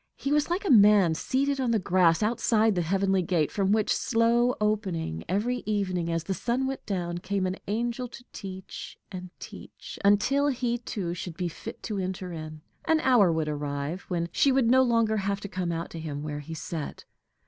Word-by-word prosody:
He 275 - -3
was 295 +1 +2
like 360 +4 -1
a 380 - +2
man 205 -6 +6
seated 275 - 0
on 255 -2 0
the 230 - +3
grass 180 -2 +3
outside 220 0 +2
the 180 - 0
heavenly 190 +2 +1
gate, 170 -3 0
from 195 -1 +1
which, 215 -1 +2
slow 235 +1 +2
opening 190 - -1
every 220 +7 0
evening 185 -5 -1
as 165 -1 -1
the 190 - -2
sun 245 +6 -1
went 270 0 -4
down, 175 -4 -2
came 195 +1 -1
an 185 +1 -2
angel 235 +4 -2
to 245 +1 -12
teach, 190 -2 -8
and 185 -1 -7
teach, - - -10
until 210 +8 +3
he 245 -3 0
too 195 -7 -4
should 175 -1 -6
be 180 -1 -1
fit - - -9
to 210 -3 -3
enter 185 -1 -4
in: 155 -1 -7 0.2
an 320 -1 +3
hour 245 - +5
would 160 -1 -1
arrive 145 +3 -3
when 170 -2 -1
she 275 - +3
would 260 -3 +3
no 260 +1 +6
longer 230 -3 +2
have 200 0 -1
to - - -5
come 185 -3 -3
out 165 0 -4
to 165 - -7
him 150 -2 -5
where 150 -1 -4
he 160 +3 -7
sat. 155 0 -6
195 Hz, 200 wpm, -27 LUFS, 170-235 Hz, 0.2 s, man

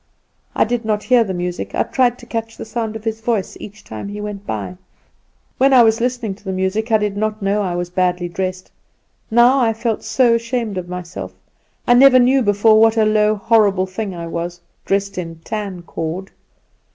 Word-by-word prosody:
I - - +4
did 240 +1 -2
not 215 -1 -1
hear 250 -2 +4
the 200 - -5
music; 180 -1 -4
I - - +2
tried 245 -2 +1
to 240 - -14
catch 225 -1 -5
the - - -7
sound 225 -1 -4
of 220 - -7
his 225 0 -3
voice 220 -5 -1
each 205 +1 -11
time 110 - -7
he 205 +1 -6
went 205 -1 -6
by. 95 -4 -4 0.8
When 270 +1 +4
I 250 -2 +8
was 225 +1 +2
listening 245 -4 -1
to 200 - -18
the 190 - -4
music 190 +5 -1
I 220 - +6
did 210 -1 -2
not 215 0 -2
know 200 +2 +1
I 180 -3 -2
was 175 0 -4
badly 180 -1 0
dressed; 185 +1 -4 0.6
now 240 +4 +5
I 230 -3 +2
felt 225 0 -2
so 245 -3 +3
ashamed 230 -4 -2
of 175 -1 -8
myself. 180 -1 -7 0.5
I 245 - +5
never 255 +1 +7
knew 255 +2 +4
before 215 0 +4
what 225 0 +4
a 220 - +4
low, 215 0 +3
horrible 200 -3 +2
thing 190 0 -5
I 170 -1 -6
was, 170 +1 -5 0.3
dressed 200 -1 -1
in 165 -2 -6
tancord. 185 -3 -5
210 Hz, 200 wpm, -19 LUFS, 185-230 Hz, 0.8 s, I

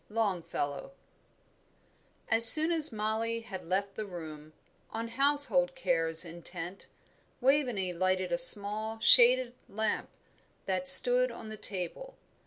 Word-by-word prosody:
LONGFELLOW. 195 - -7 1.4
As 225 +1 +8
soon 315 +2 +6
as 320 -2 -1
Mollie 220 +1 -7
had 190 -5 -13
left 195 +3 -6
the 215 0 -10
room, 155 -4 -14 0.4
on 230 +1 -10
household 270 +1 -3
cares 165 -7 -5
intent, 175 +2 -12 0.5
Waveney 245 -9 -4
lighted 185 +1 -5
a 260 - -4
small, 215 -2 +5
shaded 245 +2 +1 0.2
lamp 220 +1 -7 0.6
that 185 -1 -4
stood 245 +7 +6
on 225 -2 -14
the 215 - -11
table. 205 - -9
215 Hz, 115 wpm, -25 LUFS, 185-245 Hz, 1.4 s, As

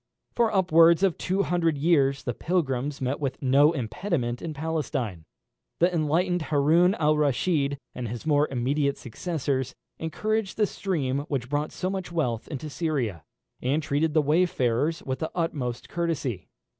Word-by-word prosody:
For 235 -2 +2
upwards 170 -2 +5
of 190 -4 +3
two 190 +2 0
hundred 165 -4 +1
years 140 -3 +2
the 125 - -2
pilgrims 140 -4 -1
met 130 +2 -1
with 135 -3 -3
no 140 +3 +5
impediment 125 - -2
in 165 - -4
Palestine. 135 - -3 0.5
The 175 +2 +3
enlightened 170 +3 +1
Haroun 160 +6 +4
Al 155 -1 +2
Reschid, 145 0 +1 0.2
and 125 -2 -4
his 120 +4 -6
more 150 -1 +3
immediate 140 +3 0
successors, 135 0 -3 0.2
encouraged 210 +6 -2
the 215 - +4
stream 150 -10 -2
which 130 -6 -3
brought 145 +1 -1
so 185 - -3
much 190 -2 -4
wealth 125 -10 -1
into 150 -1 -5
Syria, 135 - -2 0.4
and 140 +5 0
treated 150 +2 0
the 155 - +4
wayfarers 150 -2 +1
with 130 -1 -3
the 160 - -2
utmost 140 -8 -2
courtesy. 150 - -3
150 Hz, 150 wpm, -26 LUFS, 130-170 Hz, 0.5 s, upwards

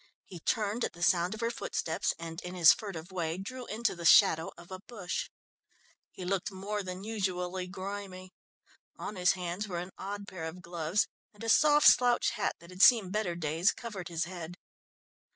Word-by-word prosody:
He 180 - -10
turned 215 +6 -1
at - - -2
the 175 - -6
sound 175 +3 +3
of 220 - -8
her 230 0 0
footsteps - - -2
and 165 0 -7
in 180 +1 -7
his 170 -2 +8
furtive 190 -5 -7
way 170 -2 -2
drew 245 +6 -7
into 225 0 -1
the 170 - -8
shadow 165 -2 +6
of 175 +1 -14
a 185 - -6
bush. 200 -3 -5 0.8
He 185 - -8
looked 195 +2 -1
more 200 +2 -3
than 185 0 -6
usually 185 -4 -2
grimy; 190 -1 -7 0.6
on 210 - -6
his 180 -1 +3
hands 180 +2 -4
were 180 -3 -4
an 180 +2 -5
odd 200 +1 -5
pair 175 -5 -6
of 175 +3 -7
gloves 170 +3 0 0.3
and 210 - -11
a 225 - -2
soft 295 +3 +5
slouch 245 -1 +5
hat 215 - -1
that 170 +1 -14
had 180 +1 -5
seen 215 -7 +7
better 200 -4 -1
days, 165 +2 +1
covered 205 -7 -7
his 165 -1 -2
head. 175 -1 -7
185 Hz, 190 wpm, -31 LUFS, 175-210 Hz, 0.8 s, his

